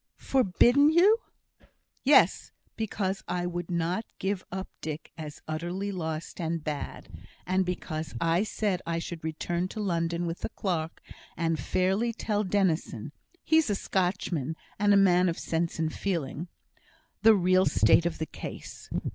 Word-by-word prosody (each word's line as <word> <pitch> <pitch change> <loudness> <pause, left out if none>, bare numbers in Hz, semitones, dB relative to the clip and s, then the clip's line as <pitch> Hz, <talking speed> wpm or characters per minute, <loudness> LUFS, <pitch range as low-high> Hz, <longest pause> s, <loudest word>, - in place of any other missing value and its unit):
"Forbidden 260 +4 +4
you!" 380 +8 +5 0.8
"Yes; - - +4 0.2
because 200 -3 -2
I 175 0 -1
would 175 -1 -4
not 175 +4 0
give 190 -1 -2
up 190 +1 -4
Dick 155 0 -5
as 155 -3 -8
utterly 175 +6 -3
lost 160 -3 -4
and 165 -1 -2
bad; 150 -2 -5 0.4
and 185 +1 +2
because 155 -5 -4
I 165 +4 +2
said 205 -3 -1
I 165 0 0
should 165 -1 -5
return 170 +3 -2
to 215 - -7
London 170 -3 0
with 165 0 -3
the - - -3
clerk, 170 -6 -3 0.3
and 165 -1 0
fairly 195 +6 +1
tell 210 -2 -1
Dennison 175 - 0 0.3
(he's 320 -4 +3
a 205 - +2
Scotchman, 175 -6 -1 0.2
and 205 0 +4
a 200 - +7
man 180 -2 +5
of 165 - -3
sense 165 +1 -1
and 160 -1 -1
feeling) 170 -3 -2 0.7
the 220 0 +7
real 185 0 +4
state 170 - +4
of 170 - -4
the 160 - -2
case. - - -9
180 Hz, 145 wpm, -28 LUFS, 165-200 Hz, 0.8 s, a